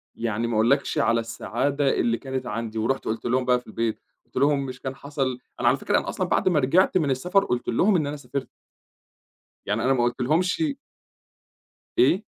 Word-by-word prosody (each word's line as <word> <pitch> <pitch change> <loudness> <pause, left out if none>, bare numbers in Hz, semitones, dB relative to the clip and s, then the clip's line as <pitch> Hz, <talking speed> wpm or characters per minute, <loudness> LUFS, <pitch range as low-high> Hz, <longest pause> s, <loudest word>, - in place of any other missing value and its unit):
يعني 115 0 -2
ما 115 - -2
أقولكش 125 +6 +2
على 115 0 +3
السعادة 135 +5 -1
اللي 115 0 +2
كانت 130 0 -4
عندي 115 +1 -4
ورُحت 115 +5 0
قُلت 110 - -3
لهم 125 +1 +1
بقى 125 -1 +3
في 125 - -22
البيت، 115 0 -2 0.3
قُلت - - -36
لهم 140 -1 +2
مش 130 -1 -7
كان 130 0 -4
حصل 135 -3 -3 0.2
أنا - - +1
على - - +4
فكرة - - +1
أنا - - -5
أصلًا - - -2
بعد - - +2
ما 160 - +3
رجعت 175 +8 +3
من 150 -6 +1
السفر 180 +10 +2
قُلت 125 -9 -2
لهم 185 - +3
إن 155 -5 +1
أنا 145 +1 -4
سافرت. 140 -1 -5 1.2
يعني 105 +2 -1
أنا 135 +1 +3
ما 120 - +1
قُلت 120 +2 -1
لهُمشِ. 180 - +1 1.2
إيه؟ 220 - +4
130 Hz, 195 wpm, -25 LUFS, 115-145 Hz, 1.2 s, على